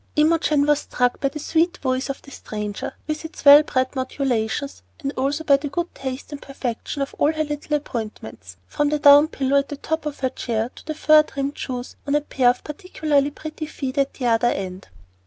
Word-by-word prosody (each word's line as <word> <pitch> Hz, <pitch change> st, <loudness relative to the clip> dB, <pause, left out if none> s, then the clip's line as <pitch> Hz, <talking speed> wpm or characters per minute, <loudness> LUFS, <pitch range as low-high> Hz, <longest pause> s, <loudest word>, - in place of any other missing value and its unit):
Imogen 305 Hz, -2 st, +3 dB
was 295 Hz, 0 st, +3 dB
struck 245 Hz, -3 st, 0 dB
by 275 Hz, -, +1 dB
the 290 Hz, -, -8 dB
sweet 330 Hz, +4 st, +1 dB
voice 260 Hz, 0 st, -1 dB
of 275 Hz, -, -5 dB
the 275 Hz, -, -14 dB
stranger, 210 Hz, -4 st, -5 dB
with 305 Hz, 0 st, -3 dB
its 320 Hz, -1 st, -9 dB
well 285 Hz, +1 st, +10 dB
bred 260 Hz, -3 st, -1 dB
modulations, 260 Hz, 0 st, -2 dB, 0.2 s
and 280 Hz, -3 st, -3 dB
also 280 Hz, +4 st, -1 dB
by 280 Hz, -3 st, +5 dB
the 290 Hz, +1 st, -5 dB
good 345 Hz, +4 st, -3 dB
taste 265 Hz, +2 st, -6 dB
and 290 Hz, -, -7 dB
perfection 275 Hz, +1 st, -4 dB
of 275 Hz, -, -7 dB
all 295 Hz, -, +4 dB
her 310 Hz, -1 st, -1 dB
little 295 Hz, 0 st, -2 dB
appointments, 215 Hz, -, -7 dB
from 290 Hz, -, 0 dB
the 300 Hz, -, +1 dB
down 290 Hz, +1 st, +7 dB
pillow 280 Hz, -2 st, +1 dB
at 280 Hz, +1 st, -6 dB
top 320 Hz, -1 st, -2 dB
of 290 Hz, -, -6 dB
her 260 Hz, -, +1 dB
chair 230 Hz, 0 st, -2 dB
to -, -, -14 dB
the 310 Hz, -, -3 dB
fur 310 Hz, 0 st, +6 dB
trimmed 280 Hz, -1 st, -4 dB
shoes 250 Hz, -1 st, -5 dB
on 285 Hz, -, +1 dB
a 295 Hz, -, +3 dB
pair 260 Hz, -4 st, +2 dB
of 245 Hz, -, -1 dB
particularly 300 Hz, -3 st, 0 dB
pretty 310 Hz, +1 st, -7 dB
feet 270 Hz, -4 st, -5 dB
at 275 Hz, 0 st, 0 dB
the 255 Hz, -, -4 dB
other 235 Hz, 0 st, +3 dB
end. 185 Hz, -2 st, -4 dB
280 Hz, 210 wpm, -22 LUFS, 255-300 Hz, 0.2 s, well